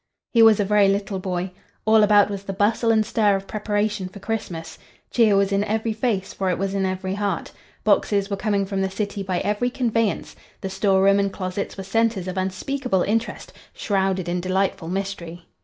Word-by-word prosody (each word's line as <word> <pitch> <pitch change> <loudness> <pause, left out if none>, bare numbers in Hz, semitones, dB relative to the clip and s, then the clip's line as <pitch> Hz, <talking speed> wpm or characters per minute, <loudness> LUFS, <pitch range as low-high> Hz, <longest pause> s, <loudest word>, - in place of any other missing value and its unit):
He 230 - +4
was 225 -2 +7
a 205 - +2
very 205 0 +4
little 195 0 -1
boy. 185 0 -3 0.3
All 220 0 +5
about 205 -1 +5
was 200 -1 -4
the 195 - -4
bustle 215 +4 +1
and 220 -1 +3
stir 210 -2 +2
of 195 0 -4
preparation 210 -2 -2
for 195 - -12
Christmas. 180 -7 -5 0.3
Cheer 220 -4 +4
was 195 0 +2
in 200 +1 +2
every 220 +1 -1
face, 215 -4 -1
for 190 -1 -1
it 180 - 0
was 195 +1 -2
in 195 -1 0
every 185 0 -3
heart. 200 -3 -2 0.3
Boxes 200 -1 +2
were 200 - -2
coming 200 -1 0
from 195 0 -2
the 190 - 0
city 200 +1 -3
by 185 -2 -2
every 210 +4 0
conveyance. 230 -4 -1 0.3
The 190 - -4
store 190 0 +2
room 195 0 +5
and 200 0 +1
closets 185 +1 -4
were 195 - -5
centres 220 -1 0
of 185 - -4
unspeakable 190 +3 -1
interest, 225 +3 -2 0.2
shrouded 190 -3 0
in 175 0 -1
delightful 185 -2 -1
mystery. 175 -2 -5
200 Hz, 195 wpm, -23 LUFS, 190-215 Hz, 0.3 s, was